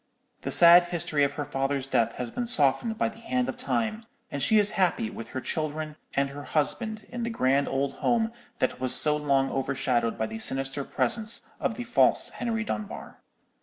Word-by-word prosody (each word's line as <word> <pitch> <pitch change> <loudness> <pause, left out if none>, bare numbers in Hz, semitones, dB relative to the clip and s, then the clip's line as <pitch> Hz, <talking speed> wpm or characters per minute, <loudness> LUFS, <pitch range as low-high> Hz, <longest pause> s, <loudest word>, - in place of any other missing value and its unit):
The - - -4
sad 175 +1 +8
history 165 -4 0
of 140 0 +1
her 145 0 -4
father's 135 -1 -2
death 115 -4 +1
has 120 -2 -5
been 245 - -3
softened 220 - +2
by - - +1
the 225 0 -9
hand 250 +2 -1
of - - -3
Time; 230 -3 -2 0.3
and 140 - -4
she 220 +7 +3
is 210 -1 +3
happy 175 - 0
with 115 - -8
her 130 +2 -5
children 155 +1 -4 0.2
and 140 0 +1
her 145 +1 -8
husband 215 - -1
in 245 0 -5
the 235 - -2
grand 140 - +1
old 135 0 -1
home 230 -1 +1 0.3
that 130 - -1
was 130 -1 +3
so 150 -1 +4
long 140 -2 +1
overshadowed 130 -3 -1
by 110 - -1
the 110 0 -6
sinister 135 +4 -1
presence 225 - -1
of 225 - -1
the 245 - -5
false 240 +1 +3
Henry 230 -1 -3
Dunbar. 215 -1 -6
150 Hz, 195 wpm, -27 LUFS, 135-220 Hz, 0.3 s, sad